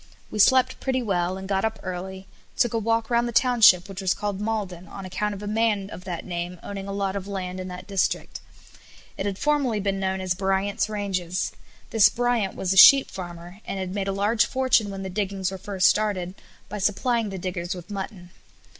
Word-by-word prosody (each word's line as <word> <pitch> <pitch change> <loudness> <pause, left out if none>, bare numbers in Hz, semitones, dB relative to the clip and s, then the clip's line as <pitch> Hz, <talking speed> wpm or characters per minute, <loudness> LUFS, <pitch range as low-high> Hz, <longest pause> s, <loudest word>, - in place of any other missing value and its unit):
We 215 - -4
slept 260 +4 +4
pretty 260 -1 -1
well, 185 -3 0
and 190 0 -7
got 195 -1 0
up 220 0 -1
early, 190 +1 -6 0.3
took 240 -3 +2
a 230 - +1
walk 225 +1 0
round 235 0 +2
the - - -3
township, 235 -7 +5
which 195 -1 -7
was 190 -1 +1
called 205 -1 -3
Maulden, 200 -5 -3
on 195 +3 -8
account 205 +3 -2
of 200 - -9
a - - -5
man 210 -2 0
of 180 - -9
that 175 -3 -5
name 175 0 -4
owning 200 -1 -6
a - - -4
lot 195 -1 -2
of 200 -1 -4
land 185 -2 -4
in 185 - -5
that 180 0 -8
district. 195 -1 -1 0.8
It 195 - -3
had 195 -2 -3
formerly 280 -6 +1
been 195 -1 -1
known 190 0 -1
as 185 -1 -1
Bryant's 195 +2 0
Ranges. 185 -4 -2 0.4
This 225 -3 +6
Bryant 240 -5 0
was 190 0 -1
a - - -2
sheep 275 +7 +9
farmer, 175 0 -8
and - - -5
had 190 -1 -4
made 200 -1 -2
a - - 0
large 205 +3 +2
fortune 260 -5 +2
when 195 -1 -6
the 190 - -4
diggings 195 -1 -2
were 190 - -6
first 190 -1 +2
started 195 -4 0 0.3
by 210 - -6
supplying 225 +3 +1
the 195 - -5
diggers 175 -1 -4
with 180 +3 -10
mutton. 190 -3 -6
195 Hz, 210 wpm, -25 LUFS, 185-215 Hz, 0.8 s, sheep